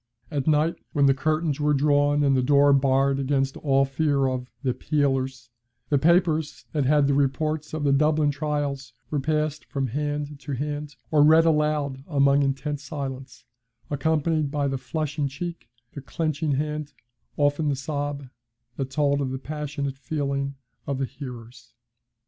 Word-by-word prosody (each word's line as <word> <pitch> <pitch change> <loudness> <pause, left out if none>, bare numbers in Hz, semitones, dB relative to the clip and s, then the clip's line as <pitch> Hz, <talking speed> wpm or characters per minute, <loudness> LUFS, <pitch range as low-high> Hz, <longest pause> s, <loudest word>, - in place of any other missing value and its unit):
At 145 -2 -2
night, 155 +2 +2 0.2
when 145 -3 +3
the 135 - +5
curtains 155 +1 0
were 150 0 +2
drawn 145 +1 +3
and 140 -1 +3
the 130 - +3
door 140 +2 +5
barred 135 0 +3
against 135 0 0
all 135 -2 +2
fear 140 0 +1
of 130 -1 -2 0.2
'the 130 -2 +1
peelers,' 130 -3 -1 0.4
the 145 - +3
papers 160 -1 +2
that 145 -3 +1
had 145 +1 +4
the 140 - +2
reports 150 +3 0
of 155 -1 -3
the 140 -1 +3
Dublin 150 +1 +3
trials 145 -2 -3 0.2
were 150 - +1
passed 155 +1 -1
from 135 -2 -2
hand 145 +2 -3
to 145 0 -6
hand, 145 +2 -4 0.2
or 150 - +5
read 160 +2 +6
aloud 150 -4 +1
amid 140 -2 +3
intense 140 +1 -2
silence, 135 -2 -6 0.5
accompanied 155 +1 +1
by 145 -1 0
the 135 -1 -2
flushing 150 0 -2
cheek, 170 +5 -6 0.2
the 140 - -7
clenching 155 0 -1
hand, 150 +1 -3 0.4
often 145 +1 +2
the 140 - +1
sob, 145 0 -4 0.5
that 135 -1 -3
told 140 0 +1
of 135 - -1
the 130 - -3
passionate 140 -1 -4
feeling 140 -1 -2 0.3
of 140 -1 -1
the 135 - 0
hearers. 120 -3 -10
145 Hz, 160 wpm, -25 LUFS, 135-150 Hz, 0.5 s, read